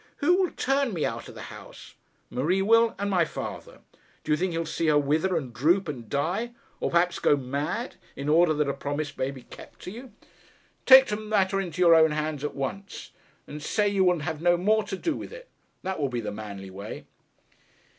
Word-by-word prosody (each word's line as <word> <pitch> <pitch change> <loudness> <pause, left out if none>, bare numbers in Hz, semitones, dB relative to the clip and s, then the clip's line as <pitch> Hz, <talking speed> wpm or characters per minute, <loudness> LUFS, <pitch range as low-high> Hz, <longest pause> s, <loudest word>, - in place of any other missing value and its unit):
'Who 350 +5 +3
will 365 - +1
turn 270 -5 0
me 160 - 0
out - - -4
of - - -12
the - - -8
house?' - - -12 0.4
'Marie 175 +9 +1
will, 230 +2 +4
and 200 - -2
my 180 -3 +3
father. - - -7 0.4
Do - - -3
you - - +5
think 185 +3 -1
he'll 165 0 -2
see 160 +1 -2
her 150 -1 +5
wither 155 +6 +1
and 130 -6 -5
droop 170 - +2
and 125 -7 -6
die, 180 +12 -1 0.3
or - - -1
perhaps 175 +1 +2
go - - +4
mad, 140 - -3 0.2
in 140 +1 -5
order 165 +2 +5
that 150 -1 +1
a 140 - 0
promise 145 +2 -4
may 130 - -1
be 135 -3 -9
kept - - -13
to 180 - -7
you? 240 +3 -10 0.8
Take 265 0 +10
the 210 -4 -2
matter 200 -3 +1
into 180 -2 -5
your 170 -1 +7
own 160 -1 +5
hands 150 -1 -3
at 150 - -3
once, 165 +9 -5 0.3
and 150 +1 -8
say 205 +7 +1
you 195 -1 +2
will 180 -3 +2
have 155 +1 -4
no 175 0 +4
more 215 +4 +2
to 190 - -4
do 320 - -1
with - - -7
it. - - -11 0.3
That 190 -1 -3
will 140 -2 0
be 120 -1 -3
the 105 -2 -4
manly 100 -2 -8
way.' 100 +3 -8
165 Hz, 215 wpm, -26 LUFS, 145-200 Hz, 0.8 s, Take